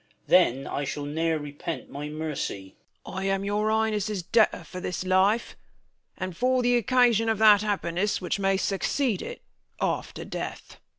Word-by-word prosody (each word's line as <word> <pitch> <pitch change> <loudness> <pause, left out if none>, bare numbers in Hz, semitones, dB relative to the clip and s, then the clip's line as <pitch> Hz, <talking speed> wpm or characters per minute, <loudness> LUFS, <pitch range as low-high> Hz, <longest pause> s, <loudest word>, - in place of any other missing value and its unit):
That 130 +3 +4
I 145 - -3
shall 145 +1 -4
ne'er 160 +2 0
rej^ent 145 +3 -6
my 145 +2 -6
mercy. 150 -11 -4 0.3
Bern. - - -8
I 190 - -2
am 195 0 0
your 210 +1 0
Highness' 215 -3 0
debtor 220 +5 +2
for 185 - -8
this 180 0 -3
life, 190 +5 +2 0.6
And 185 -2 -4
for 255 +5 +2
th' 245 0 +3
occasion 240 -2 +3
of 220 - +1
that 210 -1 +7
happiness 205 -2 -1
Which 185 +2 -2
may 195 0 +2
succeed 205 +4 0
it 485 - -7 0.4
after - - -2
death. - - -6
195 Hz, 160 wpm, -26 LUFS, 165-220 Hz, 0.6 s, that